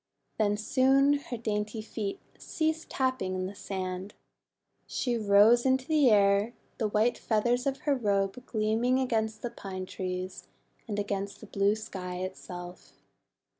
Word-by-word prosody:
Then 205 Hz, -1 st, +2 dB
soon 270 Hz, +5 st, +4 dB
her 250 Hz, -3 st, -6 dB
dainty 215 Hz, 0 st, -2 dB
feet 210 Hz, -2 st, -4 dB, 0.2 s
ceased 315 Hz, 0 st, -2 dB
tapping 255 Hz, -8 st, 0 dB
the 185 Hz, -, -2 dB
THE 185 Hz, -, -1 dB
ROBE -, -, -7 dB
OF -, -, -14 dB
FEATHERS -, -, -12 dB
99 185 Hz, -2 st, -2 dB
sand. 210 Hz, -, -17 dB, 0.7 s
She 245 Hz, -2 st, -1 dB
rose 215 Hz, +2 st, +5 dB
into 265 Hz, +3 st, +1 dB
air, 210 Hz, -6 st, +4 dB, 0.3 s
the 220 Hz, -, +1 dB
white 215 Hz, +3 st, +1 dB
feathers 240 Hz, +4 st, +1 dB
of 270 Hz, -1 st, -1 dB
her 290 Hz, -, +2 dB
robe 205 Hz, -1 st, 0 dB
gleaming 225 Hz, +3 st, +1 dB
against 220 Hz, -4 st, -1 dB
the 240 Hz, -, -3 dB
Pine 185 Hz, -1 st, -6 dB
Trees, 185 Hz, 0 st, -5 dB, 0.4 s
and 210 Hz, -2 st, -3 dB
against 200 Hz, 0 st, -3 dB
the -, -, -10 dB
blue 200 Hz, 0 st, +2 dB
sky 185 Hz, -4 st, -6 dB
itself. 180 Hz, -1 st, -7 dB
215 Hz, 155 wpm, -29 LUFS, 195-245 Hz, 0.7 s, rose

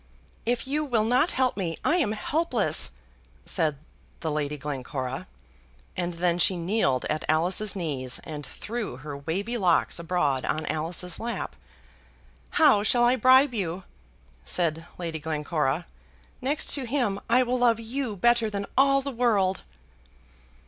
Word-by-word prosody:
"If 240 Hz, 0 st, 0 dB
you 295 Hz, +3 st, 0 dB
will 240 Hz, -7 st, +1 dB
not 250 Hz, +9 st, +3 dB
help 255 Hz, -1 st, +1 dB
me, 170 Hz, -5 st, -3 dB
I 340 Hz, -, +3 dB
am 255 Hz, -12 st, +1 dB
helpless!" 250 Hz, -, +1 dB, 0.5 s
said 155 Hz, -3 st, +2 dB, 0.4 s
the 160 Hz, -, -2 dB
Lady 150 Hz, 0 st, -2 dB
Glencora, 135 Hz, +2 st, -4 dB, 0.7 s
and 175 Hz, -1 st, -2 dB
then 175 Hz, 0 st, +1 dB
she 185 Hz, +1 st, +3 dB
kneeled 170 Hz, -, +1 dB
at 155 Hz, -, -2 dB
Alice's 180 Hz, +7 st, +2 dB
knees 140 Hz, -8 st, -1 dB
and 150 Hz, -2 st, -6 dB
threw 220 Hz, -, -5 dB
her 145 Hz, +2 st, -7 dB
wavy 195 Hz, +12 st, -3 dB
locks 180 Hz, -2 st, +2 dB
abroad 160 Hz, -6 st, 0 dB
on 155 Hz, -, -1 dB
Alice's 165 Hz, +3 st, -1 dB
lap. 235 Hz, +1 st, -4 dB, 1.0 s
"How 215 Hz, -10 st, +6 dB
shall 240 Hz, +3 st, +3 dB
I 240 Hz, +1 st, +5 dB
bribe 260 Hz, +2 st, +5 dB
you?" 185 Hz, -4 st, -3 dB, 0.6 s
said 165 Hz, -, 0 dB
Lady 165 Hz, -2 st, -4 dB
Glencora. 155 Hz, 0 st, -1 dB, 0.6 s
"Next 280 Hz, +4 st, +1 dB
to 270 Hz, -4 st, 0 dB
him 230 Hz, -6 st, 0 dB
I 250 Hz, +2 st, +5 dB
will 250 Hz, +1 st, -1 dB
love 235 Hz, -2 st, +3 dB
you 230 Hz, 0 st, -3 dB
better 235 Hz, +2 st, +3 dB
than 200 Hz, -1 st, -3 dB
all 275 Hz, 0 st, +4 dB
the 280 Hz, -, -3 dB
world." 210 Hz, -7 st, +1 dB
195 Hz, 140 wpm, -26 LUFS, 160-240 Hz, 1.0 s, How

